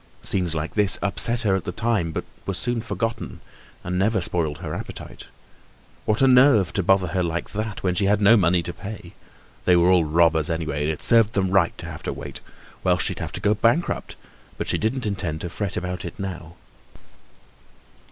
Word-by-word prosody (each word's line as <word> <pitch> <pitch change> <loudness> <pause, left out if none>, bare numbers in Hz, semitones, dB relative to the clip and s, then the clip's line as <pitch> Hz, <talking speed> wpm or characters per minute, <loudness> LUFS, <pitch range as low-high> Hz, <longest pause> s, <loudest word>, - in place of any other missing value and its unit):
Scenes 90 -4 0
like 80 +1 -3
this 105 -3 +4
upset 115 +4 0
her 100 -5 +2
at 95 - -2
the - - -4
time, 110 -4 0
but - - -3 0.2
were 95 - -1
soon 120 +3 -1
forgotten 115 0 -4 0.4
and 90 +1 -2
never 110 +2 +2
spoiled 85 -4 -2
her - - -6
appetite. - - -8 0.8
What 110 +4 +1
a - - +6
nerve 125 - +5
to 100 - +1
bother 95 0 +2
her 95 - 0
like 85 -1 -3
that 105 0 -4
when 90 -2 +1
she 100 +3 +1
had 105 +1 +3
no 105 +3 +6
money 90 -4 +3
to 85 - -5
pay. 100 0 -9 0.5
They 90 - +5
were 85 +1 +4
all 90 -2 +5
robbers 80 0 +2
anyway 75 -3 -2
and 80 - +1
it 80 - -5
served 115 -2 +4
them 95 -3 0
right 95 - +2
to - - -7
have - - -8
to - - -3
wait. 70 +1 -7 0.4
Well, 90 -1 +3
she'd - - -2
have - - -4
to - - -4
go 105 - +2
bankrupt, 115 +10 0 0.4
but - - -4
she - - 0
didn't 120 +3 -1
intend 90 -6 -3
to 85 - -5
fret 100 0 -3
about 90 0 -4
it 85 - -7
now. 85 -4 -6
95 Hz, 200 wpm, -23 LUFS, 85-105 Hz, 0.8 s, a